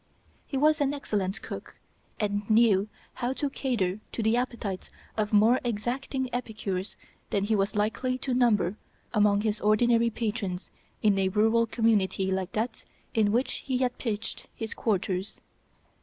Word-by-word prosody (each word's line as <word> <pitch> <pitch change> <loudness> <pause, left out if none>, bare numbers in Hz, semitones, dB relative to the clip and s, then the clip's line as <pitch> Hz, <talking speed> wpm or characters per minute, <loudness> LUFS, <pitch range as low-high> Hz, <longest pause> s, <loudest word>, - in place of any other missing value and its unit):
He 275 - -2
was 305 +2 +4
an 285 0 +2
excellent 205 -7 -2
cook, - - -7 0.4
and 205 0 -1
knew 215 -2 +4 0.2
how 245 +1 -2
to 280 +1 -2
cater 215 -9 -1
to 230 - -2
the 220 +2 +3
appetites 235 -6 -2 0.3
of 210 -1 0
more 220 +4 +5
exacting 245 +4 -2
epicures 215 -5 -3 0.3
than 200 - +1
he 215 +2 +2
was 195 0 0
likely 225 +5 0
to 255 0 -2
number 215 -6 +3 0.4
among 205 -1 +4
his 215 -1 -1
ordinary 230 +2 +4
patrons 210 -5 -3 0.3
in 205 -2 +4
a 190 -1 +2
rural 225 +3 +3
community 205 -4 +2
like 190 -1 -2
that 225 +2 -2 0.3
in 215 -2 +3
which 245 +5 +1
he 260 -2 -2
had 250 -1 0
piched 220 -3 -3
his 225 0 -4
quarters. 195 -2 -1
220 Hz, 150 wpm, -28 LUFS, 205-240 Hz, 0.4 s, more